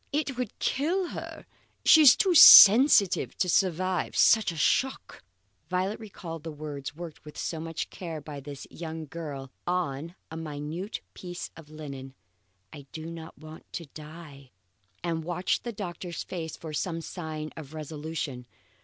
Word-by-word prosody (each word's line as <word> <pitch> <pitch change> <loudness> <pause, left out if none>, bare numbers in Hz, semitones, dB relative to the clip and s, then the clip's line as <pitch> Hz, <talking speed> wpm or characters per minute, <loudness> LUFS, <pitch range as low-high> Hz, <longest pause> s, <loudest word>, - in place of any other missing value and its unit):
It 285 -2 -1
would 250 -3 -5
kill 345 +6 0
her. - - -8 0.4
She's 305 -5 +8
too 380 -3 +2
sensitive 225 - +8
to 185 - +1
survive 185 0 0
such 220 -4 +5
a 165 - -9
shock." 260 +11 0 0.5
Violet 185 +4 -1
recalled 180 -7 -8
the 160 - -6
words 150 -2 -7
worked 165 -1 -9
with 150 -1 -12
so 165 - -3
much 165 0 -5
care 165 -4 -6
by 145 0 -8
this 140 0 -9
young 160 -1 -7
girl 140 -4 -7 0.2
on 170 -2 -2 0.2
a 160 - -6
minute 160 +5 -5
piece 175 -1 -7
of 160 -2 -14
linen, 140 -4 -9 0.6
I 140 -2 -11
do 160 0 -7
not 165 -1 -10
want 155 0 -13
to 170 - -5
die, 150 -3 -11 0.5
and 165 -2 -2
watched 180 +6 -2
the 240 - -3
doctor's 180 -4 -6
face 165 -3 -6
for 160 -2 -8
some 165 +2 -2
sign 155 -3 -6
of 155 -1 -10
resolution. 150 -4 -6
165 Hz, 150 wpm, -27 LUFS, 155-185 Hz, 0.6 s, She's